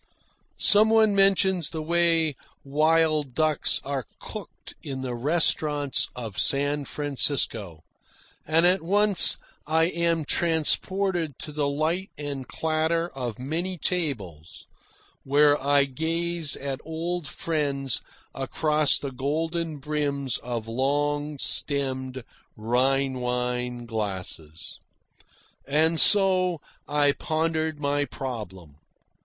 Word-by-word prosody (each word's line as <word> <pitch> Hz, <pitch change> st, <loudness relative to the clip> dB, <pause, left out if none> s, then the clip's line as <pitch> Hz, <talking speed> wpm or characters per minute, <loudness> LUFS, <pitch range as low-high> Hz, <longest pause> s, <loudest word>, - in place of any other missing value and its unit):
Some 215 Hz, +1 st, +5 dB
one 220 Hz, -2 st, +5 dB
mentions 195 Hz, -3 st, +3 dB
the 160 Hz, -2 st, -5 dB
way 165 Hz, -2 st, +2 dB, 0.3 s
wild 155 Hz, -1 st, +2 dB
ducks 155 Hz, -2 st, +1 dB
are 135 Hz, -3 st, -3 dB
cooked -, -, -9 dB
in 135 Hz, -2 st, -5 dB
the 130 Hz, -2 st, -3 dB
restaurants 145 Hz, +1 st, 0 dB
of 115 Hz, -6 st, -5 dB
San 145 Hz, +1 st, +1 dB
Francisco, 125 Hz, -, 0 dB, 0.6 s
and 160 Hz, +2 st, +3 dB
at 180 Hz, +2 st, +4 dB
once 200 Hz, +3 st, +4 dB, 0.3 s
I 160 Hz, +1 st, +3 dB
am 170 Hz, -2 st, 0 dB
transported 170 Hz, 0 st, 0 dB
to 150 Hz, -, -8 dB
the 145 Hz, -1 st, -1 dB
light 160 Hz, +7 st, -1 dB
and 140 Hz, -3 st, -5 dB
clatter 160 Hz, +1 st, 0 dB
of 125 Hz, -7 st, -5 dB
many 170 Hz, +8 st, -3 dB
tables, 105 Hz, -, -3 dB, 0.6 s
where 145 Hz, +1 st, +4 dB
I 140 Hz, 0 st, +4 dB
gaze 165 Hz, +3 st, -2 dB
at 140 Hz, 0 st, -5 dB
old 165 Hz, +1 st, -3 dB
friends 140 Hz, -6 st, -1 dB, 0.3 s
across 150 Hz, +2 st, +1 dB
the 140 Hz, -, -5 dB
golden 160 Hz, +4 st, -2 dB
brims 140 Hz, -2 st, -2 dB
of 120 Hz, -2 st, -5 dB
long 145 Hz, +4 st, 0 dB
stemmed 130 Hz, -2 st, -1 dB, 0.3 s
Rhine 130 Hz, +4 st, +1 dB
wine 125 Hz, 0 st, -2 dB
glasses. 95 Hz, -8 st, -5 dB, 0.9 s
And 160 Hz, +3 st, +2 dB
so 185 Hz, -4 st, +4 dB, 0.3 s
I 145 Hz, -1 st, +3 dB
pondered 160 Hz, 0 st, -1 dB
my 145 Hz, 0 st, 0 dB
problem. 105 Hz, -, -7 dB
145 Hz, 105 wpm, -26 LUFS, 130-165 Hz, 0.9 s, Some